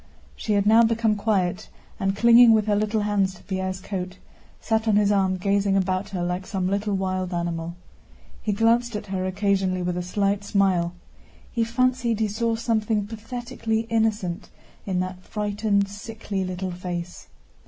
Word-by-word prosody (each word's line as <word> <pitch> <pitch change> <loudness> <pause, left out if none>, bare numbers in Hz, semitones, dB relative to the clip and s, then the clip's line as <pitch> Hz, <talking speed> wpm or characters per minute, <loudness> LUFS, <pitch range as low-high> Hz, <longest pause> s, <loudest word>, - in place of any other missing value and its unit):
She 215 - -2
had 200 -1 +2
now 220 +2 +6
become 225 -1 +2
quiet 200 -4 0 0.3
and, 195 -1 0
clinging 235 +2 +7
with 215 -1 +3
her 210 -1 +2
little 215 +1 0
hands 200 -2 +1
to - - -17
Pierre's 190 -1 -3
coat, 185 -1 -5 0.4
sat 220 0 0
on 215 - +4
his 205 0 +4
arm 190 -2 +2
gazing 195 +1 +1
about 190 +1 0
her 185 -3 -3
like 180 +1 -3
some 190 -3 -1
little 200 +1 0
wild 185 -1 -2
animal. 170 -1 -3 0.7
He 215 - -1
glanced 230 +2 +2
at 210 - -4
her 190 -1 -2
occasionally 190 -1 0
with 175 0 -1
a - - -1
slight 200 +2 0
smile. 185 -4 +1 0.6
He 230 - 0
fancied 235 -1 +1
he 220 - +2
saw 225 +2 -1
something 220 -2 0
pathetically 225 +1 -3
innocent 215 -5 0 0.4
in 185 -2 0
that 185 0 -5
frightened, 205 -1 0
sickly 205 -1 -5
little 185 0 -4
face. 175 -1 -6
200 Hz, 165 wpm, -24 LUFS, 185-220 Hz, 0.7 s, clinging